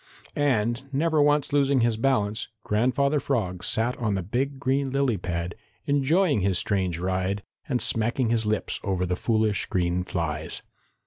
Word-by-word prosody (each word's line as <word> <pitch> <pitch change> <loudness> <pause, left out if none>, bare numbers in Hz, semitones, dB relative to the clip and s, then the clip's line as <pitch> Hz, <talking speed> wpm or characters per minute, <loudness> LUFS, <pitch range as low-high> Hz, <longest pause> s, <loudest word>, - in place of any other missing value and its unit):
And, 120 -4 +1
never 155 +2 +2
once 145 -1 +2
losing 140 -2 +3
his 115 -1 +2
balance, 110 -3 0 0.2
Grandfather 140 +7 +1
Frog 100 -10 -2
sat 115 +3 +1
on 110 -4 0
the 95 - -2
big 135 +8 -2
green 135 +1 0
lily 135 -3 +1
pad, 85 -1 -3 0.3
enjoying 145 - +2
his 95 -1 +1
strange 95 -4 0
ride 95 +2 -1 0.3
and 125 -3 +1
smacking 115 +2 +1
his 115 -1 +2
lips 105 0 -1
over 95 -2 0
the 90 0 -1
foolish 110 0 0
green 90 0 0
flies. 80 -4 -3
115 Hz, 150 wpm, -26 LUFS, 95-135 Hz, 0.3 s, losing